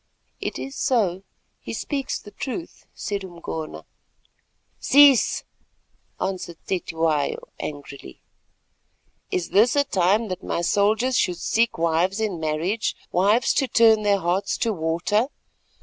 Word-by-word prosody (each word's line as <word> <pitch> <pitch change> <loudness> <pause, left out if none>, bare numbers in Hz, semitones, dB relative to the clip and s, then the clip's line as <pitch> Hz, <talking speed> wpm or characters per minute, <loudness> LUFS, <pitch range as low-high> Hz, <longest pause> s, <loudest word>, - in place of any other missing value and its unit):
"It - - -4
is 270 +1 -6
so; 195 -8 +1 0.4
he - - -7
speaks 275 -3 -3
the 205 - -13
truth," 310 - -7
said 200 -1 -4
Umgona. 170 -3 -7 0.9
"Cease," 280 -3 +5 0.8
answered 180 -3 -4
Cetywayo 160 -5 0 0.2
angrily. 140 - -8 1.1
"Is 180 - -2
this 225 +7 +4
a 285 - +4
time 205 -2 +1
that 185 - -4
my - - -2
soldiers 220 +8 +2
should 180 -1 0
seek 230 +6 +1
wives 170 +5 +1
in 210 -6 -2
marriage, 160 +8 -1 0.2
wives 205 +7 +3
to 270 - +1
turn 225 -3 +5
their 205 -1 +3
hearts 185 +2 -1
to 225 - +1
water? 170 +7 0
195 Hz, 120 wpm, -23 LUFS, 170-230 Hz, 1.1 s, Cease